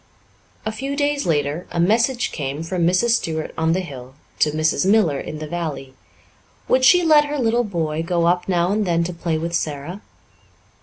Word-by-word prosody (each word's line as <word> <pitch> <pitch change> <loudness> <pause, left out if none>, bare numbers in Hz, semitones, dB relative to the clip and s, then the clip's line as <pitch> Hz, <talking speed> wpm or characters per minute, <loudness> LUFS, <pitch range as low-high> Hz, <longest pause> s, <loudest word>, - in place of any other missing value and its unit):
A 215 - -1
few 270 +6 -4
days 285 -3 0
later 150 +1 -1
a 170 - -4
message 230 +7 +2
came 145 +1 -4
from 170 0 0
Mrs. 185 +7 +2
Stuart 160 -1 -4
on 160 0 +1
the 185 - 0
hill 130 -6 -10 0.2
to 155 - +4
Mrs. 155 +3 +1
Miller 190 -8 +3
in 155 - -6
the 155 - -6
valley. 155 -5 -5 0.7
Would 255 0 +2
she 355 +6 +6
let 305 -2 +5
her 295 0 -3
little 240 -1 +1
boy 165 -7 -2
go 170 0 0
up 175 +2 +1
now 175 0 +1
and 210 -1 0
then 170 -1 +1
to 180 +1 -4
play 170 -1 -2
with 170 +2 -4
Sara? 155 +5 -3
170 Hz, 190 wpm, -21 LUFS, 155-220 Hz, 0.7 s, she